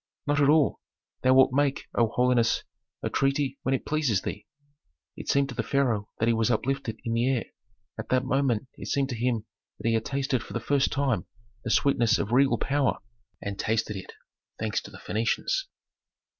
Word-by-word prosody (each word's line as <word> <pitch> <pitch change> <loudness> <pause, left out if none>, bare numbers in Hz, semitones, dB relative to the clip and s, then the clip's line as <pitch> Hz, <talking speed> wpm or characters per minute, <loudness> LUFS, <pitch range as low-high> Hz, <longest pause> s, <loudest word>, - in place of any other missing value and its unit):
"Not 145 0 +2
at 140 - +5
all. 150 -2 +4 0.4
Thou 130 0 +4
wilt 130 -1 +6
make, 140 0 +1
O 115 - +3
holiness, 120 0 +2 0.4
a - - 0
treaty 135 0 0
when 135 - +1
it - - -5
pleases 145 -11 +1
thee." 105 - -5 0.7
It - - -8
seemed 140 0 +3
to - - -5
the 120 - 0
pharaoh 120 -8 0
that 115 - +1
he 115 - +4
was 115 0 +1
uplifted 125 -3 -1
in 115 - -1
the 120 +3 +2
air. 130 -4 +1 0.6
At - - -6
that 130 0 +2
moment 130 -3 +1
it - - -6
seemed 140 -2 0
to 125 - -3
him 115 -2 -1 0.3
that - - -4
he 115 - +3
had 110 -1 +1
tasted 135 -2 -1
for - - -10
the 120 - -1
first 140 +4 +1
time 135 -9 0 0.4
the 115 - -3
sweetness 120 -2 +3
of 105 - -3
regal 135 +3 +4
power, 140 -1 +1 0.5
and 100 0 -4
tasted 110 -1 0
it, 95 - -7 0.5
thanks 110 -1 -1
to - - -11
the - - -12
Phœnicians. 115 - -1
125 Hz, 195 wpm, -27 LUFS, 115-140 Hz, 0.7 s, wilt